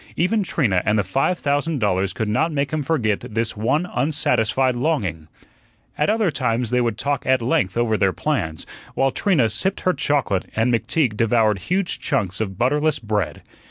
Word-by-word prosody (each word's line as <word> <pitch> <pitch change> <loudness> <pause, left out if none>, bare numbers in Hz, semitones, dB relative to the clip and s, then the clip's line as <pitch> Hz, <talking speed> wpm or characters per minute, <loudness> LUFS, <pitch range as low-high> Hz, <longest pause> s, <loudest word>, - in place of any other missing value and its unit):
Even 205 +6 +1
Trina 120 - +1
and 105 +1 +1
the 105 - +2
five 135 - 0
thousand 145 +2 0
dollars 95 -4 0
could 110 +3 -3
not 110 +10 +1
make 140 -1 -2
him 155 - 0
forget 130 -9 0
this 115 -2 -3
one 120 +11 0
unsatisfied 130 -5 +1
longing. 105 - -1 0.7
At 150 - +1
other 215 -5 +2
times 120 -4 -1
they 125 0 +2
would 115 -3 -1
talk 140 +2 -1
at 130 0 +4
length 115 -5 0
over 115 -2 +1
their 95 -1 +3
plans, 90 - -2 0.3
while 135 0 +2
Trina 160 - +2
sipped 115 - -2
her 185 - +2
chocolate 130 - 0
and 115 +2 +2
McTeague 115 -1 0
devoured 110 -2 +2
huge 185 0 0
chunks 100 -8 -1
of 95 -4 -3
butterless 150 +5 +1
bread. 105 -5 -3
125 Hz, 175 wpm, -21 LUFS, 105-150 Hz, 0.7 s, at